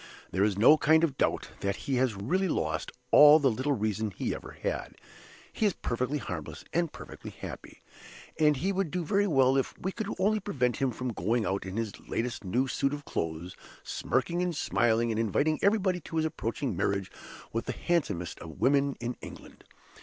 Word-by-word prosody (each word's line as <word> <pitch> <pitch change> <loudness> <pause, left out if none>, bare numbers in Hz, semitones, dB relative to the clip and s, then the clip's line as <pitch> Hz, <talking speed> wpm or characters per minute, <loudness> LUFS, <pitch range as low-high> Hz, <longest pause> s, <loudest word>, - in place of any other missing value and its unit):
There 95 - +2
is 100 -2 +1
no 135 +9 +7
kind 160 +1 +4
of 150 -5 +1
doubt - - 0
that 100 0 -1
he 135 -2 0
has 125 -4 +1
really 175 - 0
lost 80 - -1 0.2
all 150 +1 +9
the 140 -4 +3
little 130 +6 0
reason 110 -2 -1
he 95 - -3
ever - - -8
had. - - -3 0.6
He 215 - +2
is 200 - +1
perfectly 125 +5 -2
harmless, - - -6
and 170 -1 +1
perfectly - - -9
happy. - - -9 0.6
And 150 -2 +4
he 185 +8 0
would 195 -3 -1
do 175 +2 -2
very 200 +6 +2
well 135 -5 +4
if 135 - -1
we 190 - -3
could 220 0 -4
only 210 +3 +2
prevent 125 - 0
him 135 - +1
from 125 0 -4
going 110 +5 0
out 95 0 -2
in 95 +3 -5
his 115 -2 -1 0.2
last 115 0 -2
new 120 +8 0
suit 140 +2 0
of 145 0 -10
clothes, 80 +2 -4 0.3
smirking 175 +1 -1
and 180 -2 -1
smiling 120 -3 +2
and 110 - -1
inviting 140 +8 +1
everybody 195 -3 +2
to 165 - -9
his 160 0 +2
approaching 135 -2 -2
marriage 100 -1 -1 0.4
with 115 - -2
the - - 0
handsomest 110 - -1
woman 140 - +1
in 120 +1 -4
England. - - -11
130 Hz, 190 wpm, -29 LUFS, 110-160 Hz, 0.6 s, all